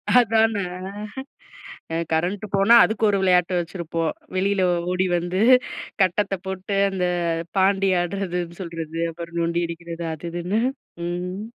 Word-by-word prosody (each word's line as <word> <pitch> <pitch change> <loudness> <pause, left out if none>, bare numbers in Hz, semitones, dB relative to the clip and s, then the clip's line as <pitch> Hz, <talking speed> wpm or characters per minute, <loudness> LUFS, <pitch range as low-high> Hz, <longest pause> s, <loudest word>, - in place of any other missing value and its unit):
அதானே. 225 -3 +4 1.3
அ - - 0 0.2
கரண்ட் 180 +6 0
போனா 200 +4 +6
அதுக்கு 220 0 -1
ஒரு 200 - +1
வெளயாட்டு 180 -1 +3
வச்சுருப்போம். 165 -1 -3 0.3
வெளியில 195 0 +2 0.3
ஓடி 185 +1 +1
வந்து, 175 +3 -1 0.6
கட்டத்த 195 +2 +1
போட்டு 190 +1 -3
அந்த 185 -2 -1 0.5
பாண்டி 195 0 +3
ஆடுறதுன்னு 175 -1 -3
சொல்றது, 165 -1 -5
அப்புறம் 170 0 -7
நொண்டி 170 +1 0
அடிக்குறது 170 0 -6
அது 165 +2 -9
இதுன்னு, 180 +6 -1 0.5
ம். 180 +3 -4
180 Hz, 120 wpm, -23 LUFS, 170-195 Hz, 1.3 s, போனா